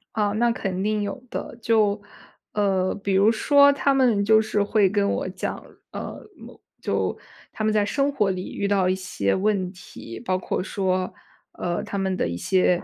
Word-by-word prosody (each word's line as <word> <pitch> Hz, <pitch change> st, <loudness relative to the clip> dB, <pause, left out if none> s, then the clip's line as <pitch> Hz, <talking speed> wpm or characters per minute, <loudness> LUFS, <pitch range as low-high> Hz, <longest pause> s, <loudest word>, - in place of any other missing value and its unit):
啊， 205 Hz, -2 st, +1 dB
那 235 Hz, +2 st, +2 dB
肯 190 Hz, -4 st, -3 dB
定 215 Hz, 0 st, 0 dB
有 205 Hz, +5 st, -4 dB
的。 235 Hz, -, -6 dB
就， 215 Hz, -2 st, +2 dB, 0.5 s
呃， 195 Hz, -3 st, +1 dB
比 200 Hz, -1 st, -2 dB
如 200 Hz, +4 st, +5 dB
说 285 Hz, +5 st, +5 dB
他 280 Hz, 0 st, +1 dB
们 240 Hz, -7 st, +3 dB
就 220 Hz, +1 st, +6 dB
是 215 Hz, -1 st, 0 dB
会 205 Hz, -1 st, +3 dB
跟 200 Hz, 0 st, +1 dB
我 -, -, -1 dB
讲， 185 Hz, -, -4 dB, 0.3 s
呃， -, -, -6 dB, 0.2 s
某 -, -, -13 dB, 0.2 s
就 -, -, -1 dB, 0.4 s
他 215 Hz, -, -4 dB
们 215 Hz, -, +2 dB
在 210 Hz, -1 st, +3 dB
生 275 Hz, +6 st, +1 dB
活 210 Hz, -8 st, +1 dB
里 185 Hz, -1 st, -4 dB
遇 200 Hz, -, -1 dB
到 195 Hz, -2 st, +2 dB
一 185 Hz, -, +2 dB
些 145 Hz, -, -1 dB
问 190 Hz, -2 st, 0 dB
题， 115 Hz, -, -10 dB
包 185 Hz, 0 st, -1 dB
括 185 Hz, -, -2 dB
说， 185 Hz, -1 st, -1 dB, 0.4 s
呃， 175 Hz, -1 st, -2 dB
他 200 Hz, -, -5 dB
们 190 Hz, -1 st, 0 dB
的 -, -, 0 dB
一 85 Hz, -, -3 dB
些 180 Hz, -, +2 dB
200 Hz, 200 characters per minute, -24 LUFS, 185-215 Hz, 0.5 s, 就